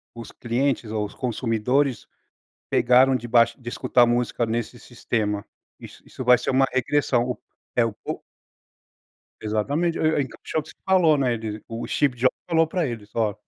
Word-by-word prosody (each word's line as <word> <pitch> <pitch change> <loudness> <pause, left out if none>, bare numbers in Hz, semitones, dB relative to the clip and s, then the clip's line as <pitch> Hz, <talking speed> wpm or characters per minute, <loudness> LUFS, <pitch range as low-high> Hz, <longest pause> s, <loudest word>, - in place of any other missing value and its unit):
os 115 -1 -9
clientes 120 -1 -1
ou 110 -1 -1
os 105 - -8
consumidores 125 +2 0 0.6
pegaram 130 +2 +4
de 120 -1 -4
baix 115 0 +4
de 120 -3 -7
escutar 120 0 +3
música 120 0 0
nesse 115 +1 -3
sistema. 110 -3 -3 0.3
Isso - - -13
isso 130 - -8
vai 125 0 +6
ser 125 - -4
uma 135 +1 +4
regressão. 125 -2 +1 0.4
É 120 -2 +4
o 115 - -3 1.5
Exatamente, 140 +11 -1
e 160 0 +2
e - - +3
encaixou 150 +3 -4
que - - -14
você - - -17
falou 180 -5 +4
,né, 125 -4 +1
ele 110 -1 -5
o 115 0 -5
Steve 140 -4 +1
Jobs 130 +2 +1
falou 165 -1 +3
para 170 0 -1
eles: 110 -4 -7
"Ó". 110 -3 0
120 Hz, 165 wpm, -24 LUFS, 115-135 Hz, 1.5 s, vai